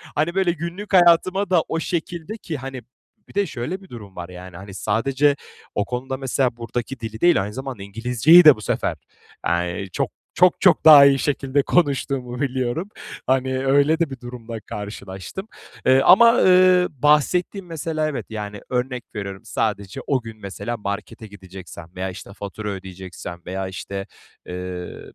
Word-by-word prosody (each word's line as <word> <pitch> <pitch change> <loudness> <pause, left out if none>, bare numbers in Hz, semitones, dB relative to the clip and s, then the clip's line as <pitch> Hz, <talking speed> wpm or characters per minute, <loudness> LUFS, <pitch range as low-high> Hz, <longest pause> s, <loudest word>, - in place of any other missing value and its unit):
hani, 160 +4 0
böyle, 190 -2 +2
günlük 170 +5 -6
hayatıma 185 +2 +4
da 180 -3 +4
o 165 - -2
şekilde 170 +4 -4
ki 165 -7 -5
hani, 135 -1 -7 0.5
bir - - -17
de 200 0 +1
şöyle 160 +7 -5
bir 190 - -16
durum 105 -5 -11
var: 85 0 -7
Yani, 90 -1 -10
hani, 95 +2 -10
sadece 135 +9 +1 0.4
o 105 - 0
konuda, 130 +2 -4
mesela, 130 -2 -1
buradaki 120 +2 -5
dili 110 -1 -7
değil, 175 - +5
aynı 105 +1 -6
zamanda 130 -4 -6
İngilizceyi 125 - +5
de 150 -3 +10
bu 110 - -12
sefer, - - -1 0.5
eee, 85 +3 -1
çok - - -1 0.2
çok, 180 -1 +4
çok 185 - +4
daha 150 -3 +10
iyi 140 -1 +4
şekilde 140 -1 0
konuştuğumu 135 -6 0
biliyorum, 130 +6 -2 0.4
hani, 130 0 +1
öyle 145 +4 +3
de 170 -3 +1
bir 135 -2 -8
durumla 120 -2 -8
karşılaştım. 105 - -7 0.4
Eee, 130 +1 +5
ama, 230 - +7
ııı, 185 -1 +5
bahsettiğim, 150 - +1
mesela, 160 -2 -2
evet 150 -3 -4
Yani, 105 -2 -6
örnek 125 -1 -2
veriyorum, 100 -2 -5
sadece 100 -4 -2
o 135 -3 +1
gün, 115 -1 -10
mesela, 100 +4 -5
markete 105 +1 -6
gideceksem 95 -4 -11
veya, 95 +1 -3
işte, 95 +2 -10
fatura 105 +1 -6
ödeyeceksem 95 -2 -8
veya, 95 +1 -4
işte, 95 +1 -6 0.4
eee, 90 0 -6
125 Hz, 160 wpm, -22 LUFS, 100-155 Hz, 0.5 s, de